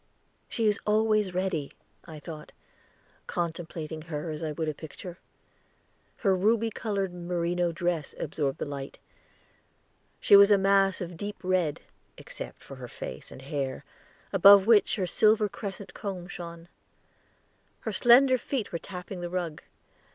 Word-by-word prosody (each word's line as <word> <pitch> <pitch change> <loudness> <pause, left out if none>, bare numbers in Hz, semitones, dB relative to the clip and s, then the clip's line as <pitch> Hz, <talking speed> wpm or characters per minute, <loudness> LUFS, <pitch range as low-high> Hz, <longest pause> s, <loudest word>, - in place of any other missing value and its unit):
"She 230 - -1
is 210 -1 +3
always 215 -3 +2
ready," 180 -6 -1 0.3
I 160 -2 -9
thought, 150 0 -9 0.7
contemplating 165 -2 -4
her 155 0 -5
as 155 0 -6
I 160 -1 -2
would 155 +1 -3
a 155 - -1
picture. 170 +4 -9 1.0
Her 195 -4 +2
ruby 225 +4 +2
colored 200 -5 -2
merino 175 0 -1
dress 170 -3 -2
absorbed 145 -2 -2
the - - -3
light; 140 -1 -6 1.2
she - - +6
was 200 0 +9
a 205 - +6
mass 195 0 +3
of 175 -1 -6
deep 205 +3 -5
red, 180 -5 0 0.4
except - - -9
her - - -8
face - - -8
and 130 - -11
hair, 140 -1 -3 0.5
above 195 +1 +8
which 220 -2 +5
her 195 -4 -1
silver 215 +3 +3
crescent 200 -1 -7
comb 190 -4 -5
shone. 170 -2 -8 1.1
Her - - -4
slender 255 +1 +6
feet 250 -5 -3
were 170 - -3
tapping 180 0 -7
the 175 - -4
rug. 170 -4 -3
180 Hz, 140 wpm, -28 LUFS, 160-200 Hz, 1.2 s, was